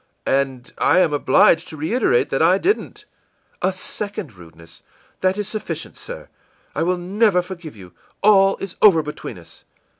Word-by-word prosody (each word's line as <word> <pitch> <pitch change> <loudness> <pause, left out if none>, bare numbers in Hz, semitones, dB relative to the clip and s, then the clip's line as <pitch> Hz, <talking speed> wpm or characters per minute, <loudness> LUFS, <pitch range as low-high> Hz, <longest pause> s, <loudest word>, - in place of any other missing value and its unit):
î - - -1
ìAnd 135 -2 -1
I - - +3
am 175 -5 +3
obliged 155 +4 +3
to 155 - -9
reiterate 155 - +1
that 135 - 0
I 175 +4 +5
didn't.î 400 - -2 0.6
ìA - - +1
second 190 - -6
rudeness! 85 -2 -15 0.4
That 185 +1 +1
is 210 -2 -3
sufficient, 215 - -5
sir. - - -9 0.5
I - - -2
will 180 +2 +1
never 190 +1 +1
forgive 175 -6 -9
you. 90 -3 -13 0.3
All 195 -2 +5
is 195 -2 -7
over 175 -7 +6
between 150 0 -7
us. - - -16
180 Hz, 160 wpm, -20 LUFS, 140-195 Hz, 0.6 s, over